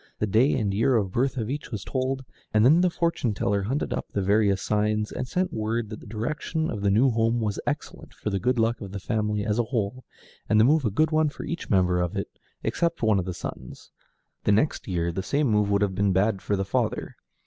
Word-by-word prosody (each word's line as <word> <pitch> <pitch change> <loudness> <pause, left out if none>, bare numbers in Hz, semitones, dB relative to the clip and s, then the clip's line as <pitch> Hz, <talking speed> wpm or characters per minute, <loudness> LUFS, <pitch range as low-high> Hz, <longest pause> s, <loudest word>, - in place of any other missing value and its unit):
The - - 0
day 110 +7 +3
and 105 -6 0
year 120 +6 +2
of 100 -5 +1
birth 130 +5 0
of 110 -3 -2
each 145 +4 -4
was 105 -4 -5
told, 130 +1 -2 0.3
and 110 +1 +5
then 160 +7 +6
the 180 - +4
fortune 165 - -1
teller 100 0 0
hunted 130 +10 -2
up - - -4
the 100 - -2
various 100 0 +3
signs, 105 +1 0
and 130 - -4
sent 180 +6 -1
word 110 0 -2
that 110 - -6
the - - -13
direction 150 +9 -2
of 105 - -4
the 100 - +2
new 120 +7 +4
home 115 +1 +1
was 105 -3 -2
excellent - - -4
for 105 - -5
the 100 - 0
good 125 +6 +1
luck 115 +1 +1
of 100 -2 -7
the 100 - -4
family 105 0 -1
as 110 +1 0
a 120 - +2
whole, 120 +1 -2 0.5
and 110 - +4
the - - +7
move 145 +3 +4
a - - +3
good 155 +10 +1
one 155 -1 +3
for - - -9
each 170 - -5
member 90 -2 +3
of 90 -1 -2
it - - -5 0.2
except 170 -4 -1
one 110 -3 +4
of 90 - -2
the 90 - -3
sons; - - -8 0.5
the - - +2
next 110 +9 +1
year 85 -3 -1
the 95 +3 -3
same 145 +10 0
move 105 -4 +2
would 100 -1 +2
be 100 +1 +1
bad 95 +1 +1
for 105 - 0
the 95 0 -1
father. 95 - -1
110 Hz, 240 wpm, -26 LUFS, 100-130 Hz, 0.5 s, the